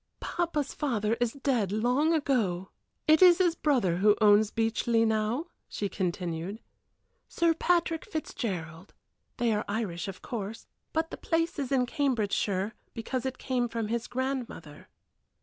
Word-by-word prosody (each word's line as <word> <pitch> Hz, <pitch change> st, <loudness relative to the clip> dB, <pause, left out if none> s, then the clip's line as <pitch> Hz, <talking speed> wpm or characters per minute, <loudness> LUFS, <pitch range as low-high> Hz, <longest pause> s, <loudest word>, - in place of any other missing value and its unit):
"Papa's 325 Hz, -5 st, -2 dB
father 225 Hz, -7 st, 0 dB
is 240 Hz, -1 st, +1 dB
dead 255 Hz, -8 st, 0 dB
long 250 Hz, +9 st, +2 dB
ago; 225 Hz, -, 0 dB, 0.4 s
it 310 Hz, +2 st, +6 dB
is 355 Hz, -2 st, +8 dB
his 355 Hz, -3 st, +3 dB
brother 250 Hz, -, +1 dB
who 210 Hz, +2 st, +4 dB
owns 210 Hz, 0 st, +5 dB
Beechleigh 225 Hz, +1 st, +1 dB
now," 220 Hz, +7 st, 0 dB, 0.2 s
she 205 Hz, -, -3 dB
continued 180 Hz, +2 st, -3 dB, 0.7 s
"Sir 335 Hz, -1 st, +2 dB
Patrick 335 Hz, -1 st, +1 dB
Fitzgerald. 185 Hz, -, -5 dB, 0.4 s
They 235 Hz, -2 st, +2 dB
are 210 Hz, -, 0 dB
Irish, 205 Hz, -5 st, -3 dB
of 190 Hz, -2 st, -8 dB
course, 220 Hz, -2 st, -5 dB, 0.3 s
but 320 Hz, 0 st, -1 dB
the -, -, -6 dB
place 330 Hz, -1 st, -1 dB
is 275 Hz, -2 st, -3 dB
in 260 Hz, -2 st, +3 dB
Cambridgeshire, 215 Hz, -6 st, 0 dB, 0.2 s
because 255 Hz, +3 st, -3 dB
it 260 Hz, 0 st, -4 dB
came 250 Hz, -2 st, -1 dB
from 225 Hz, -2 st, -3 dB
his 235 Hz, 0 st, -2 dB
grandmother." 250 Hz, -, -4 dB
230 Hz, 140 wpm, -29 LUFS, 205-280 Hz, 0.7 s, is